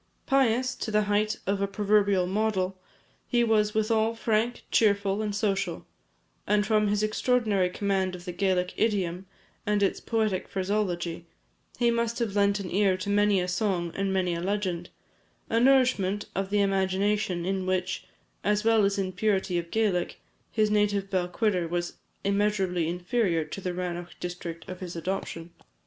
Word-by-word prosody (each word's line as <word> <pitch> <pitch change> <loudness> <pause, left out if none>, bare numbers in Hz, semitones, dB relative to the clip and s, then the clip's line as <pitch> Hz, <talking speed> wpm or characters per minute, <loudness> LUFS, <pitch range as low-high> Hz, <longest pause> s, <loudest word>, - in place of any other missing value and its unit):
Pious, 255 -2 +2
to 240 - -5
the 210 0 +2
height 210 +1 +1
of 200 +1 0
a 200 - +1
proverbial 200 -2 +2
model, 195 -1 0 0.5
he 240 -1 +2
was 215 -2 +2
withal 220 +1 +2
frank, 225 +1 0
cheerful, 200 -1 +2
and 210 -2 -2
social; 205 -2 -1 0.6
and 205 0 +3
from 215 -1 +2
his 205 +1 +1
extraordinary 215 -4 +1
command 190 -1 -1
of 175 0 -11
the 180 - -4
Gaelic 180 0 0
idiom, 190 -4 0 0.4
and 210 -1 +1
its 195 - +1
poetic 220 -5 -1
phraseology, 185 -4 -2 0.5
he 240 -1 +3
must 235 0 0
have 225 -4 -2
lent 200 0 +3
an 185 -3 -5
ear 195 -1 +3
to 200 +2 -3
many 205 -1 +3
a 180 - -1
song 180 -3 -1
and 195 0 -1
many 185 -2 +1
a 170 - -3
legend 185 -3 -2 0.6
a 230 - +3
nourishment 245 -7 +3
of 195 0 -2
the 205 0 +2
imagination 195 -1 +1
in 190 0 -1
which, 185 0 -1 0.4
as 210 +1 +1
well 225 -1 +4
as 200 +1 0
in 190 -1 -1
purity 190 -2 0
of 170 0 -7
Gaelic, 205 -5 0 0.3
his 215 -1 +2
native 205 -2 +1
Balquhidder 180 0 0
was 175 +1 -3 0.3
immeasurably 195 -4 +1
inferior 175 -1 0
to 155 +6 -7
the 185 - -2
Rannoch 175 -1 -5
district 175 -2 -6
of 185 -1 -7
his 180 -2 -6
adoption. 170 -1 -4
200 Hz, 160 wpm, -27 LUFS, 180-215 Hz, 0.6 s, well